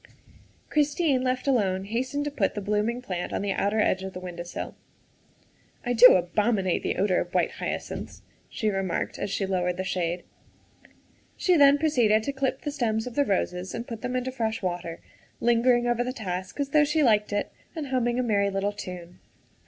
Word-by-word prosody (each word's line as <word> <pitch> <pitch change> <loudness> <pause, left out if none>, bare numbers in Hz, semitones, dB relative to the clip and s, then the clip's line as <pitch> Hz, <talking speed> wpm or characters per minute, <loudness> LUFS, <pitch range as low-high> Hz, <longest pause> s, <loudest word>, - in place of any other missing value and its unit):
Christine, 295 -2 +2
left 255 +1 -1
alone, 195 -8 +2
hastened 260 +7 -2
to 295 - -2
put 215 -9 0
the - - -2
blooming 210 +4 -1
plant 180 -6 -4
on - - -2
the 200 - -1
outer 205 +3 0
edge 190 -3 +2
of 190 0 -6
the 180 - -6
window 180 -1 -7
sill. 175 0 -6 0.6
" - - -32
I 245 - +1
do 245 +2 +9
abominate 190 +1 +1
the - - -1
odor 190 -1 +2
of 175 +2 -7
white 175 -2 +2
hyacinths," - - -5 0.3
she 220 -4 -1
remarked 195 -2 -2
as - - -2
she 195 0 -1
lowered 180 -2 -1
the 185 - -2
shade. 175 -2 -2 1.1
She 365 - +3
then 285 -2 +7
proceeded 240 -9 +3
to 280 - -2
clip 270 -1 -1
the 295 - -3
stems 220 -6 -1
of 250 - -6
the 285 - +3
roses 185 -3 -1
and 235 - -4
put 230 -2 -6
them 250 0 -3
into 255 +1 -1
fresh 225 -4 -2
water, 175 -2 -3 0.4
lingering 240 +1 +3
over 240 0 +1
the 250 +1 -3
task 185 -2 -5
as 280 -1 -1
though 300 +1 +5
she 300 +1 +2
liked 210 -5 +3
it 205 0 -1 0.2
and 300 -4 -4
humming 240 -2 +1
a 255 - +1
merry 200 -4 +2
little 195 +1 -1
tune. 180 -3 -8
220 Hz, 195 wpm, -26 LUFS, 190-255 Hz, 1.1 s, do